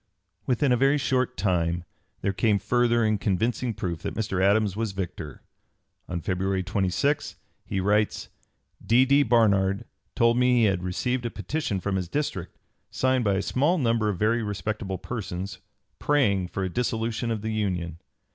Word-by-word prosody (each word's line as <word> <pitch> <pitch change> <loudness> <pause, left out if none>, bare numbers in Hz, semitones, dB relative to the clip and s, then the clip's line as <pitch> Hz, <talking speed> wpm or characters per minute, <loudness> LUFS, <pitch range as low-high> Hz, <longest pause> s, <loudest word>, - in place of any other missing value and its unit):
Within 130 +2 +2
a 125 - +4
very 135 +3 +3
short 130 -3 0
time 85 -3 0 0.4
there 100 - 0
came 105 +1 +2
further 120 +1 +2
and 110 -2 +1
convincing 115 +5 0
proof 85 -4 -4
that - - -4
Mr. 100 -4 -1
Adams 100 0 +3
was 110 -2 -2
victor. 85 -6 -6 0.7
On 85 -1 -3
February 95 +2 -1
26 100 +10 0 0.3
he 95 - -1
writes: 105 +2 +1 0.6
"D. 125 +3 +4
D. 140 +2 +4
Barnard 100 -6 +3 0.3
told 115 +1 +3
me 125 -1 +4
he - - +4
had 95 -4 +2
received 120 +7 -1
a - - -3
petition 105 - -3
from 95 +1 -1
his 90 -2 -3
District, 95 - -3 0.3
signed 130 -1 +1
by 100 -3 +2
a 95 - 0
small 145 - +2
number 115 -6 +1
of 100 - -2
very 110 +5 +2
respectable 105 -2 -3
persons, 95 -2 -5 0.4
praying 105 -11 +2
for 95 +2 -4
a - - 0
dissolution 115 +2 -1
of 110 -2 -2
the 110 0 -2
Union. 90 -6 -2
105 Hz, 165 wpm, -26 LUFS, 95-120 Hz, 0.7 s, a